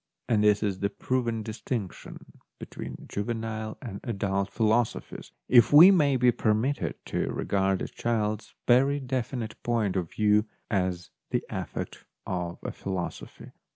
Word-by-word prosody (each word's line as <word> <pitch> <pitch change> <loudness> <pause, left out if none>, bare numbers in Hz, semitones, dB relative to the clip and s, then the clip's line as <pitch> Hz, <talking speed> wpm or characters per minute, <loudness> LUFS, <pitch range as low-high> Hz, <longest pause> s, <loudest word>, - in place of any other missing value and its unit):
And 110 -3 +2
this 105 0 +4
is 100 -3 -1
the 100 - 0
proved 115 +1 -1
dis 110 +1 -7
tinction 110 -8 -6 0.2
between - - -8
juvenile 110 0 -4
and 100 -5 -6
adult 100 -3 -1
philoso 110 +1 +2
phies, - - -11 0.2
if 120 -2 +6
we 165 +6 +10
may 145 -8 +4
be 125 0 +5
permitted 110 +6 0
to - - -2
regard 95 -1 0
a - - -3
child's 110 -2 -2
very 135 +4 +4
definite 125 -3 -4
point 110 -5 0
of 90 -4 -1
view 105 0 +3 0.3
as 90 -2 -1 0.2
the - - 0
effect - - -5 0.2
of 90 -2 -3
a - - -3
philosophy. 95 -3 -6
110 Hz, 145 wpm, -27 LUFS, 100-120 Hz, 0.3 s, we